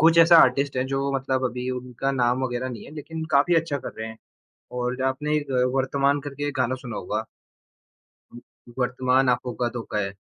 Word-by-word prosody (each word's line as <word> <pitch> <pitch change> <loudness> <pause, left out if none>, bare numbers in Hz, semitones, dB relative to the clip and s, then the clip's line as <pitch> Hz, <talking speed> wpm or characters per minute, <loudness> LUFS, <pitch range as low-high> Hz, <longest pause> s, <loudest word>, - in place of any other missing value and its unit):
कुछ 165 +2 +6
ऐसा 165 +1 +8
आर्टिस्ट 135 +1 +4
है 130 - +1
जो 135 +1 -1
मतलब 130 -1 -1
अभी 125 0 -2
उनका 125 +1 -3
नाम 125 0 +1
वगैरह 125 0 -2
नहीं 120 -4 -7
है - - -11
लेकिन 160 +1 -6
काफ़ी 145 +5 +4
अच्छा 160 -3 +1
कर - - -7
रहे 110 - -4
हैं, 110 0 -10 0.5
और 125 +1 -2
आपने 150 +3 0
एक 145 -2 -4 0.2
वर्तमान 140 +1 +2
करके 145 0 -4
गाना 130 +1 0
सुना 125 -4 -7
होगा। - - -3 1.1
अ, - - -13 0.4
वर्तमान 125 +1 +2
आँखों 125 0 0
का 120 - +2
धोखा 110 -2 -4
है, 100 -1 -2
130 Hz, 185 wpm, -25 LUFS, 125-140 Hz, 1.1 s, ऐसा